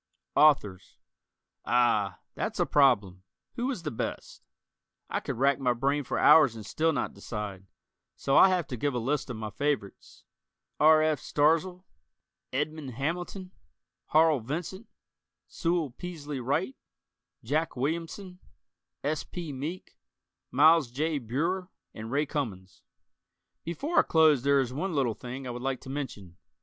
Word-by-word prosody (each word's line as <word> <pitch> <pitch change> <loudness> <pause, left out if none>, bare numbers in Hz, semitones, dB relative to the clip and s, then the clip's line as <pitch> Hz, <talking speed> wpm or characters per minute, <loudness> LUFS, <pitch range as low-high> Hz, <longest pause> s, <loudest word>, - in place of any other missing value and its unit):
Authors: 105 -12 +3 0.7
Ah, 110 -6 +1
that's - - -4
a - - +3
problem. 105 -10 +3 0.3
Who 245 +2 -2
is 245 -11 -4
the 150 - -3
best? 110 - -5 0.7
I - - 0
could - - -5
rack 140 +2 +2
my 125 -2 +2
brain 140 +4 0
for - - -3
hours 145 -8 +6
and 110 -2 -8
still 160 +9 +1
not 155 - -2
decide, 100 -4 -6 0.5
so 135 - 0
I'll 190 - +8
have 180 -3 +1
to 125 - -4
give 140 +2 -1
a - - 0
list 135 +5 -1
of 120 - -5
my 110 -1 -5
favorites: 140 -8 -3 0.6
R. 155 0 +6
F. 155 -3 +1
Starzl, 165 +7 +1 0.7
Edmond 145 -2 -3
Hamilton, 175 - -4 0.6
Harl 155 -2 +4
Vincent, 170 - -5 0.6
Sewell 165 - -1
Peaslee 150 -2 -6
Wright, 130 +1 -1 0.7
Jack 155 +7 -1
Williamson, 165 +7 -4 0.6
S. 150 +2 -1
P. 170 -5 -7
Meek, 155 +8 -7 0.5
Miles 155 0 +5
J. 150 +4 -1
Breuer 165 - -2 0.2
and 110 +1 -7
Ray 145 +4 +1
Cummings. 105 - -5 0.8
Before 280 - 0
I - - +8
close 155 -5 +4
there 140 +1 +3
is 125 -1 -4
one 175 +5 -3
little 130 -5 +1
thing 130 +4 -8
I 125 - -4
would 120 0 -6
like 135 0 -2
to 130 - -8
mention. 105 -11 -6
145 Hz, 145 wpm, -28 LUFS, 125-160 Hz, 0.8 s, I'll